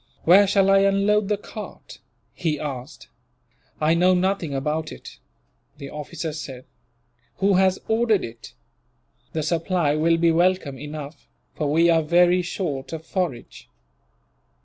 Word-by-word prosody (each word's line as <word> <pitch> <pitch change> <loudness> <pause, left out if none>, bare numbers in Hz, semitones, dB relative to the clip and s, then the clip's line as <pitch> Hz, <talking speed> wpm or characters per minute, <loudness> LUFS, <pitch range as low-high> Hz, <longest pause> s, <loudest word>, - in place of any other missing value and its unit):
"Where 195 +4 +6
shall 195 0 +3
I 195 - +6
unload 200 +1 +2
the 210 0 0
cart?" 210 +1 -10 0.3
he 155 -4 -2
asked. 135 0 -7 0.7
"I 155 +1 +3
know 180 +2 +4
nothing 180 -3 0
about 150 +3 -2
it," - - -12 0.6
the 140 -2 -9
officer 150 +1 -5
said. 135 -4 -8 0.7
"Who 200 +1 +2
has 190 0 +3
ordered 220 -2 +2
it? 115 0 -12 0.8
The 155 - -2
supply 165 -2 0
will 165 +2 +2
be 165 0 +3
welcome 170 -5 +1
enough, 150 +1 -8 0.3
for 150 -2 -2
we 165 +3 +4
are 165 -1 +3
very 175 +3 +3
short 165 -6 -4
of 160 0 -6
forage." 165 -10 -4
165 Hz, 135 wpm, -23 LUFS, 150-190 Hz, 0.8 s, Where